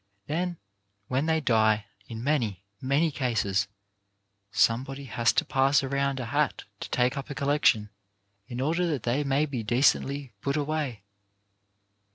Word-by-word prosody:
Then 175 +5 -2 0.5
when 135 +5 0
they 160 0 +2
die 110 -6 +3
— 100 - -31
in 115 0 -6
many, 115 -10 0 0.2
many 140 +5 +2
cases 105 -7 0 0.4
— 100 0 -49
somebody 135 +4 -4
has 120 -4 +1
to - - +2
pass 135 +1 +3
around 140 0 0
a 125 - -3
hat 115 - 0 0.2
to - - -6
take 125 +1 +1
up 135 - -5
a 140 - -5
collection 140 -7 +2 0.6
in 120 -1 -6
order 165 +6 +1
that 145 -8 -2
they 125 +5 +1
may 140 +2 +2
be 135 -6 -4
decently 135 +3 +1
put 140 +1 -1
away. 145 -7 -2
135 Hz, 155 wpm, -27 LUFS, 115-145 Hz, 0.6 s, die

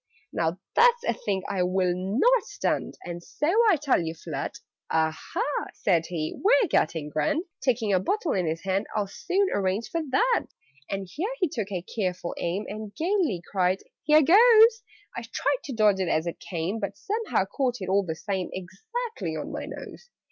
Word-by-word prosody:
"Now 165 +1 0 0.2
that's 480 0 +5
a - - +1
thing 195 -4 -2
I 190 - -1
will 180 0 +2
not 240 - +3
stand, - - -2
And 175 -1 -5
so 180 +11 -4 0.2
I 390 - +6
tell 280 - +2
you 165 0 -4
flat." 155 -4 -5 0.3
"Aha," 160 - 0 0.3
said 170 -5 +1
he, 160 -3 -3
"we're 440 +1 +5
getting 155 - +1
grand!" 155 - 0 0.2
(Taking 230 -6 +1
a 185 - +4
bottle 360 - -1
in 185 -4 0
his 160 +1 -2
hand) 195 +2 0
"I'll 210 -1 +1
soon 380 - 0
arrange 200 +3 -1
for 335 - 0
that!" 470 - +2 0.4
And 195 -1 -3
here 325 - -3
he 365 - +2
took 220 -8 -4
a 180 -3 -3
careful 180 -4 -3
aim, 180 +5 -2
And 210 0 -7
gaily 330 - 0
cried 185 -1 +1 0.2
"Here 305 0 +5
goes!" 450 - +7 0.3
I - - -3
tried - - -1
to 275 - -5
dodge 210 -4 +3
it 185 - 0
as 160 +1 +1
it 170 - -4
came, 175 +5 -3
But 200 -1 -4
somehow 420 - -1
caught 250 +4 -1
it, 185 - -5
all 195 +2 +3
the 160 -3 -4
same, 190 +1 -3
Exactly 445 - -5
on - - -5
my - - -5
nose. 485 - -9
200 Hz, 185 wpm, -26 LUFS, -, 0.4 s, goes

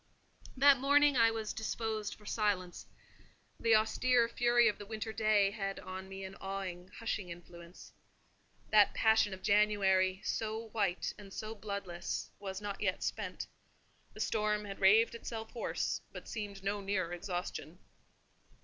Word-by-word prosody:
That 275 0 +7
morning 285 +1 +5
I 230 -2 +6
was 220 -1 -3
disposed 220 -1 -3
for 210 - -19
silence: 205 -5 -1 0.7
the 230 -1 +4
austere 235 +2 +3
fury 240 0 +3
of 210 - 0
the 205 - -7
winter 220 0 -4
day 215 -3 +3
had 195 -2 -4
on 185 +1 -7
me 195 0 -7
an 190 0 -7
awing, 190 -2 -5
hushing 215 -5 -3
influence. 170 0 -11 0.8
That 210 -2 +6
passion 220 -2 +4
of 190 0 -8
January, 195 -2 +3
so 220 0 -3
white 200 -5 -1
and 200 -1 -11
so 215 +2 -5
bloodless, 200 -5 -5
was 190 -1 -5
not 205 -1 -5
yet 185 -3 0
spent: - - -3 0.7
the - - -10
storm 210 -1 0
had 195 -1 -7
raved 215 +5 +5
itself 225 -1 -6
hoarse, 235 - -2
but - - -9
seemed 205 -3 -6
no 200 +1 -1
nearer 190 -3 -1
exhaustion. 175 -3 -5
205 Hz, 145 wpm, -33 LUFS, 190-220 Hz, 0.8 s, That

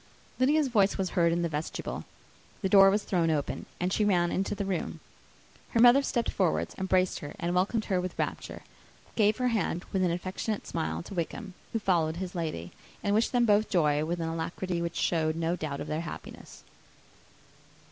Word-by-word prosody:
Lydia's 290 +3 +3
voice 205 -6 +2
was 190 -2 -1
heard 170 -3 +3
in 170 +1 0
the - - +1
vestibule; 155 0 -4 0.6
the 190 - +1
door 195 0 +8
was 205 +2 +1
thrown 170 -3 +1
open, 150 -3 -2
and 180 +2 0
she 215 - +2
ran 175 -4 +2
into 195 +2 -1
the 200 - -3
room. 190 -3 -3 0.7
Her 230 - 0
mother 245 +3 +8
stepped 240 -4 -1
forwards, 80 +2 0
embraced 185 -1 +1
her, 145 - -8
and 175 +1 -2
welcomed 200 +5 +1
her 185 -3 +1
with 180 -1 -5
rapture; - - -4 0.5
gave 215 -1 +3
her 250 -1 +1
hand 200 -6 -1
with 190 -1 +2
an 180 - +3
affectionate 185 +5 -3
smile 80 +1 -3
to - - -9
Wickham, 190 +3 -4 0.2
who - - 0
followed 170 -6 +1
his 180 +1 -5
lady; 155 - -4 0.3
and 200 - +1
wished 220 +2 +2
them 245 -1 +3
both 215 0 +3
joy, 150 -5 +2
with 170 +2 -2
an 165 - -2
alacrity 170 +2 -3
which 170 0 -3
showed 155 -2 +1
no 165 +1 0
doubt 150 -5 -4
of - - -4
their 155 +1 -2
happiness. 170 - -9
180 Hz, 190 wpm, -29 LUFS, 165-205 Hz, 0.7 s, door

